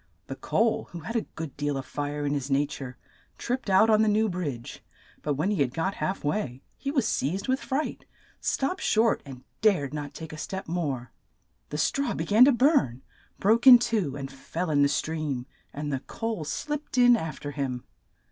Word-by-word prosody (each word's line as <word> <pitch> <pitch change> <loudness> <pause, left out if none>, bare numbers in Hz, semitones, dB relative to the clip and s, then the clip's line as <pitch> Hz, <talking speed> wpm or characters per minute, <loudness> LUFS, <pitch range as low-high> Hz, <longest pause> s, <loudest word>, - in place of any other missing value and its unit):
The - - -6
coal, 225 -1 +1
who 170 - -6
had 225 +9 -6
a 230 - 0
good 160 -3 -6
deal 145 -1 -1
of 135 - -5
fire 145 0 -3
in 145 - 0
his 140 -1 -2
na 140 +1 +3
ture, 130 -3 -7 0.4
tripped 245 -3 -3
out 190 +3 +6
on 215 -1 +5
the 220 - +3
new 215 +1 +3
bridge, 145 -10 -5 0.4
but 145 -1 -1
when 155 +9 0
he 195 -8 0
had 130 -2 0
got 190 +4 0
half 190 - -3
way, 145 -6 -2
he 275 - -4
was 270 -5 +1
seized 180 - -1
with 260 +1 +1
fright, 285 +3 -3 0.3
stopped 275 +8 -1
short, 225 +1 +3
and 130 -2 -10 0.2
dared 180 -11 +2
not 145 -2 -5
take 160 -1 -8
a 155 - -8
step 190 +3 -5
more. 140 -8 -2 0.6
The 150 - -4
straw 265 - 0
be 160 - -2
gan 215 +7 +7
to 280 - +6
burn, 250 - +2 0.3
broke 225 +6 +3
in 250 -2 +12
two, 220 - -1
and 135 -1 -6
fell 160 +5 -4
in 145 -1 +3
the 140 - +5
stream, 150 -5 -2 0.3
and 145 0 -4
the 135 - 0
coal 225 - -4
slipped 295 - -4
in 245 -1 +7
af 160 -9 -4
ter 145 - -5
him. 135 -4 -3
160 Hz, 205 wpm, -27 LUFS, 140-225 Hz, 0.6 s, in